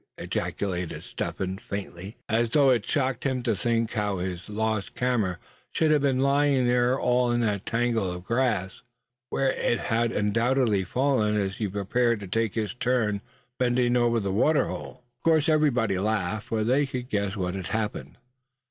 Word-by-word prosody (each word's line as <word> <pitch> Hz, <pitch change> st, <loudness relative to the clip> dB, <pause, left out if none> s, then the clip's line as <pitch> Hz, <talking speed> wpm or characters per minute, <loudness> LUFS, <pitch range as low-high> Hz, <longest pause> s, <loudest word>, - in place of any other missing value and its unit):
ejaculated 90 Hz, -4 st, -3 dB
Step -, -, -5 dB
Hen 95 Hz, 0 st, -3 dB
faintly, 100 Hz, -2 st, -7 dB
as 115 Hz, +1 st, +1 dB
though 140 Hz, +1 st, +4 dB
it 115 Hz, -5 st, +1 dB
shocked 130 Hz, -4 st, 0 dB
him 130 Hz, -3 st, -1 dB
to 115 Hz, -3 st, +1 dB
think 115 Hz, +1 st, 0 dB
how 105 Hz, -3 st, -1 dB
his 90 Hz, +1 st, -5 dB
lost 110 Hz, -1 st, -2 dB
camera 115 Hz, -8 st, 0 dB, 0.3 s
should 160 Hz, -1 st, +1 dB
have 150 Hz, -2 st, +4 dB
been 135 Hz, -2 st, +2 dB
lying 140 Hz, -1 st, +3 dB
there 120 Hz, 0 st, +3 dB
in -, -, 0 dB
all 125 Hz, -1 st, +2 dB
that 110 Hz, -5 st, 0 dB
tangle 115 Hz, -5 st, 0 dB
of 90 Hz, 0 st, -7 dB
grass, 115 Hz, -4 st, -1 dB, 0.5 s
where 135 Hz, -1 st, +1 dB
it 120 Hz, -, 0 dB
had 115 Hz, +1 st, 0 dB
undoubtedly 115 Hz, 0 st, +1 dB
fallen 125 Hz, -2 st, +1 dB
as 95 Hz, -2 st, -1 dB
he 110 Hz, -, -1 dB
prepared 110 Hz, +4 st, 0 dB
to 100 Hz, -, -7 dB
take 115 Hz, +2 st, -1 dB
his 110 Hz, -2 st, -2 dB
turn 120 Hz, -5 st, 0 dB, 0.4 s
bending 125 Hz, -1 st, +2 dB
over 120 Hz, -1 st, +3 dB
the 100 Hz, -2 st, -2 dB
water 150 Hz, +9 st, +3 dB
hole. 125 Hz, -, -7 dB, 0.2 s
Of -, -, -42 dB
course 160 Hz, -2 st, +3 dB
everybody 125 Hz, -, +2 dB
laughed, 105 Hz, +1 st, -1 dB
for 110 Hz, -3 st, 0 dB
they 135 Hz, +5 st, +2 dB
could 125 Hz, -2 st, -5 dB
guess 100 Hz, -4 st, -1 dB
what 90 Hz, -2 st, -2 dB
had 95 Hz, -2 st, -5 dB
happened. 105 Hz, -9 st, -3 dB
115 Hz, 175 wpm, -26 LUFS, 100-125 Hz, 0.5 s, though